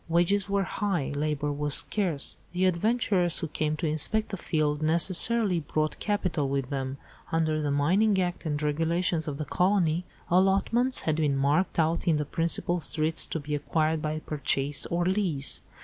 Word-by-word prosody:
Wages 180 +4 +1
were 200 0 +1
high, 190 -6 -2
labour 150 0 -2
was 145 0 +1
scarce. 180 -9 +1 0.2
The 180 +1 +1
adventurers 185 -1 +1
who 165 - 0
came 155 0 -2
to 170 - -3
inspect 160 +8 +1
the - - -4
"field" 155 -4 -1
necessarily 180 +5 +3
brought 155 0 -2
capital 185 -9 -1
with 135 -1 -2
them. 135 -1 -3 0.3
Under 160 -2 0
the 145 - -1
Mining 190 +9 +2
Act 180 -1 -2
and 150 -3 -2
Regulations 165 +2 0
of 145 -2 -4
the 150 - -4
colony, 180 -2 +1 0.2
allotments 195 +8 +2
had 155 -1 -1
been 145 -3 +1
marked 145 +7 +1
out 165 +2 0
in 165 - +4
the 150 0 -1
principal 170 +3 +1
streets 160 0 0
to 160 - -4
be 150 0 -6
acquired 155 +2 -1
by 155 0 -2
purchase 145 -1 +1
or 175 +1 -1
lease. 180 -8 0
160 Hz, 165 wpm, -27 LUFS, 150-185 Hz, 0.3 s, in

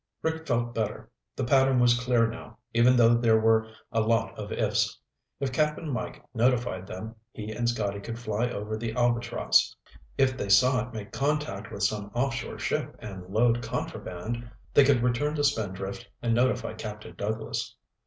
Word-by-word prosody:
Rick 160 0 -2
felt 120 -1 0
better. 110 -2 -3 0.2
The 130 - -2
pattern 130 0 +4
was 120 -1 +4
clear 125 -2 +3
now, 115 - -9 0.2
even 120 +2 +5
though 120 -1 +6
there 115 -2 +4
were 110 0 +3 0.2
a 115 -1 +2
lot 115 0 +1
of - - -7
"ifs." - - +1 0.4
If 135 -2 -2
Cap'n 150 +2 0
Mike 125 - -4
notified 120 -6 +1
them, 110 +3 -6 0.2
he 110 0 -6
and 120 +2 0
Scotty 100 -4 -1
could 115 +3 -6
fly 115 +1 -1
over 105 -1 -4
the 115 0 -3
Albatross. 120 0 +2 0.4
If 130 -1 +3
they 100 - -3
saw 125 +5 +5
it 125 - -13
make 105 -2 -6
contact 140 -8 -1
with 100 - -4
some 100 0 0
offshore 125 0 -1
ship - - -2
and 95 -4 -8
load 115 +4 +2
contraband, 115 +2 -4 0.2
they 145 - +7
could 135 -3 +3
return 125 +5 +1
to 145 - 0
Spindrift 100 -8 -1
and 115 -1 0
notify 125 -1 +1
Captain 105 -1 -7
Douglas. 110 +2 -3
115 Hz, 170 wpm, -28 LUFS, 110-125 Hz, 0.4 s, they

